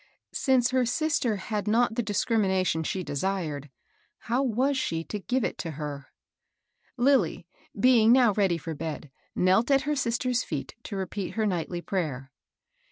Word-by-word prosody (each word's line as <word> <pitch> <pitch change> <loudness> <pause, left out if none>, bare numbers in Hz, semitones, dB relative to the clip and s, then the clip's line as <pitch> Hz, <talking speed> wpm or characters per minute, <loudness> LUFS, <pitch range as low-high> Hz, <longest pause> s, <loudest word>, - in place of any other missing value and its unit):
Since 255 -2 +2
her 255 -1 +3
sister 250 -2 0
had 205 +1 -4
not 230 +2 +3
the 240 - 0
dis 205 -3 -1
crimination 190 -7 +1
she 185 +4 -2
desired, 150 -3 -3 0.5
how 245 +4 0
was 265 +2 +1
she 165 -10 -1
to 210 - -5
give 250 +5 -1
it - - -3
to 165 - -4
her? 145 -3 -5 0.9
Lilly, 255 -7 +2 0.3
being 230 -1 +5
now 245 -4 +5
ready 195 -4 +2
for 165 +1 -6
bed, 150 -2 -6 0.2
knelt 190 +7 +3
at 275 -1 +4
her 295 +1 0
sis 240 -4 0
ter's 250 -1 0
feet 150 -5 -5
to 205 - -5
repeat 190 0 -4
her 220 -1 +1
nightly 175 -2 -2
prayer. 140 -9 -3
210 Hz, 165 wpm, -27 LUFS, 170-245 Hz, 0.9 s, being